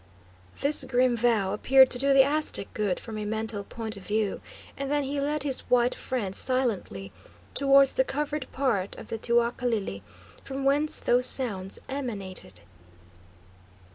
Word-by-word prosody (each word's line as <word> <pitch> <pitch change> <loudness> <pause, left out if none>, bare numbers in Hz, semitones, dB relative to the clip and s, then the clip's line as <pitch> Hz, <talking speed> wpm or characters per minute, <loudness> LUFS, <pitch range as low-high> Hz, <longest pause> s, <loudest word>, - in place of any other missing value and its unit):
This 285 +2 +3
grim 250 -1 +2
vow 220 -5 +1
appeared 265 +5 +5
to 245 - +2
do 275 +1 +3
the 270 -1 +7
Aztec 295 -7 0
good 205 -4 -1
from 220 -2 -7
a - - -4
mental 220 -1 -2
point 220 +1 -6
of 195 - -11
view, 210 -1 -1 0.3
and 275 0 -4
then 290 0 +1
he 280 +1 -3
led 295 +1 -1
his 275 -3 0
white 245 0 +3
friend 210 -7 -4
silently 220 - -1 0.4
towards 275 0 +5
the 260 - +3
covered 290 0 -4
part 230 -8 -1
of - - -11
the 225 - -4
teocalli, 235 - -1 0.4
from 270 0 -5
whence 290 +3 +1
those 250 +1 +2
sounds 200 -7 0
emanated. 200 - -5
245 Hz, 150 wpm, -27 LUFS, 210-275 Hz, 0.4 s, the